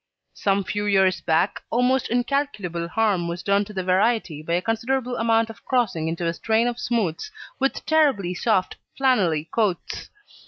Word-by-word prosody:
Some 200 0 0
few 205 +2 -3
years 190 -2 +3
back, 165 +4 +1
almost 250 +2 +1
incalculable 240 - -1
harm 200 -4 +1
was 170 +1 -5
done 200 0 +2
to 210 - -11
the 190 -2 -3
variety 190 -3 +1
by 170 +2 -3
a 175 - +2
considerable 245 +3 -1
amount 225 -1 +2
of 200 -2 -16
crossing 220 -11 0
into 165 +1 -3
a 165 - 0
strain 225 +6 +1
of 245 0 -3
smooths 230 - -1 0.3
with 270 0 -1
terribly 275 - +2
soft 185 0 0 0.2
flannelly 180 - +2
coats. 205 -7 -1
205 Hz, 160 wpm, -23 LUFS, 180-240 Hz, 0.3 s, years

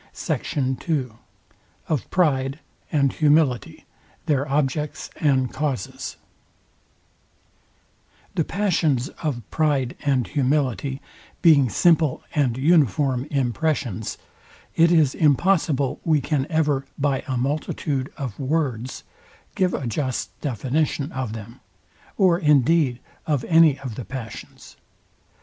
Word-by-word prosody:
SECT. 130 +2 -2
II 140 -6 +1 0.8
OF 150 -6 -2
PRIDE 135 -6 +1 0.3
AND 140 -4 +2
HUMILITY, 150 -5 +1 0.4
THEIR 140 -2 +1
OBJECTS 150 +1 -1
AND 130 -4 +1
CAUSES 140 -9 -3 2.2
The 165 - +1
passions 160 -9 0
of 120 -9 -3
PRIDE 145 -5 +1
and 135 -4 +1
HUMILITY 140 -1 -1 0.4
being 145 -7 +6
simple 160 - +3
and 130 -5 +1
uniform 140 - +2
impressions, 130 - -1 0.6
it 165 +1 +5
is 155 -6 +4
impossible 150 -3 +2
we 155 -2 +3
can 140 0 -1
ever, 145 -4 +1
by 140 -2 0
a 130 -2 -1
multitude 140 0 -2
of 130 -8 -5
words, 130 -4 -2 0.5
give 185 -1 +1
a 135 - -4
just 130 +2 -2
definition 140 - -1
of 130 -4 -4
them, 115 +1 -9 0.6
or 180 -3 +4
indeed 150 -3 +3 0.3
of 145 -5 0
any 160 -4 +5
of 130 -4 -6
the 115 +1 -7
passions. 120 -5 -9
140 Hz, 105 wpm, -23 LUFS, 130-155 Hz, 2.2 s, being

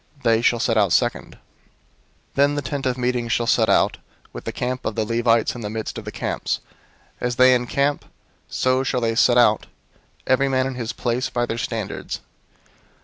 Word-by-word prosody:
They 115 -1 +3
shall 120 0 +2
set 115 -1 +2
out 100 -4 +2
second. - - 0
002:017 - - -19 1.0
"Then 140 +1 +3
the 145 - -2
tent 140 -2 -4
of 125 -1 -1
meeting 125 -1 -1
shall 115 +1 0
set - - +3
out, - - +3 0.3
with - - -8
the - - -2
camp 125 +1 -3
of - - -3
the 110 -1 0
Levites 115 0 +2
in 120 - -8
the 105 - -4
midst 110 0 -4
of - - -11
the - - -5
camps. - - -2 0.6
As 125 0 -2
they 130 +1 +6
encamp, 140 +4 0 0.4
so 130 0 +1
shall 130 -1 -1
they 115 -1 +1
set 120 +1 +4
out, 110 -3 +4 0.6
every 135 +1 +2
man 130 -1 +1
in 135 - -3
his 120 -2 -4
place, 125 +1 -2
by 120 -1 0
their 115 0 -4
standards. 115 -6 -4
125 Hz, 195 wpm, -22 LUFS, 115-130 Hz, 1.0 s, they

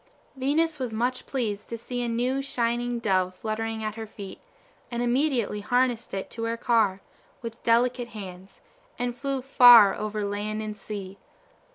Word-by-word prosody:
Venus 300 +4 +1
was 245 -4 -3
much 245 +3 -1
pleased 215 -6 -3
to 230 - -4
see 245 +2 -4
a 240 - -1
new, 250 +4 0
shining 240 -2 -1
dove 185 -5 +1
fluttering 220 +1 -3
at 215 -1 -2
her 220 0 -7
feet, 200 -2 -9 0.5
and 240 0 -2
immediately 245 -4 +1
harnessed 245 +1 0
it 195 -1 -5
to 230 -1 -4
her 230 0 -2
car, 220 -5 +2 0.4
with 230 0 -7
delicate 240 +1 +2
hands, 195 -4 -10 0.4
and 245 -1 -2
flew 270 0 -3
far 245 -6 +8
over 215 0 -3
land 205 +1 -3
and 215 -1 -4
sea. 200 -2 -7
230 Hz, 160 wpm, -26 LUFS, 210-245 Hz, 0.5 s, far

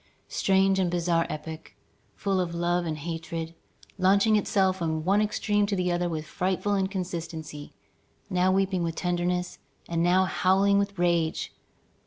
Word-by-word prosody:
Strange 195 0 +2
and 185 -2 +2
bizarre 170 -1 +1
epoch, 160 +1 -7 0.4
full 195 -2 0
of 170 -2 -2
love 175 0 0
and 155 -1 -2
hatred, 165 +1 -5 0.5
launching 200 +4 +4
itself 190 -2 +2
from 160 -3 -2
one 200 +3 +3
extreme 210 -1 +1
to 200 - -1
the 180 -1 0
other 175 0 0
with 155 -2 -4
frightful 190 +5 -1
inconstancy, 170 -6 -4 0.6
now 185 +1 +2
weeping 190 -1 +1
with 165 -1 -2
tenderness, 180 0 -1 0.3
and 165 -1 -1
now 180 +2 +4
howling 195 +2 +3
with 200 -1 -2
rage! 170 -2 0
180 Hz, 145 wpm, -27 LUFS, 170-190 Hz, 0.6 s, launching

